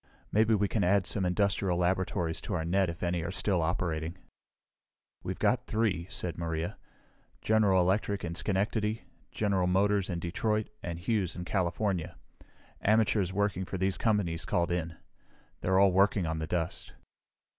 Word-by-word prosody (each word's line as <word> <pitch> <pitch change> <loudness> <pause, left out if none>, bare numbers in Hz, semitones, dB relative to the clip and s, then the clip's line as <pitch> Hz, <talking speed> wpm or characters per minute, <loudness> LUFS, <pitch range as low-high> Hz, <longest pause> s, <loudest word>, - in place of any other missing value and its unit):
Maybe 110 +1 +4
we 100 0 +1
can 100 +2 0
add 95 +1 +3
some 95 -4 0
industrial 100 -1 +1
laboratories 90 -1 0
to 100 - -3
our 80 -2 -2
net 95 +2 +2
if 85 +1 -6
any 85 -1 0
are 85 - -3
still 95 -2 +1
operating." 80 0 -2 1.0
"We've 95 - -4
got 125 0 +1
three," 105 -7 0
said 85 -2 -4
Maria. 80 0 -2 0.7
"General 105 -4 +4
Electric 100 +2 0
in 85 - -4
Schenectady, 105 +4 -1 0.3
General 100 -4 +1
Motors 100 +1 +2
in 85 - -2
Detroit, 105 +6 -1
and 85 -1 -4
Hughes 95 0 -1
in 90 - -5
California. 90 -1 -1 0.6
Amateurs 105 -3 +2
working 100 -1 0
for 95 - -5
these 95 +1 0
companies 100 -7 +1
called 85 0 0
in. 85 -1 -2 0.6
They're 95 0 +1
all 100 0 +6
working 95 0 +3
on 80 0 -2
the 80 - -3
dust." 85 0 -3
95 Hz, 155 wpm, -30 LUFS, 85-105 Hz, 1.0 s, all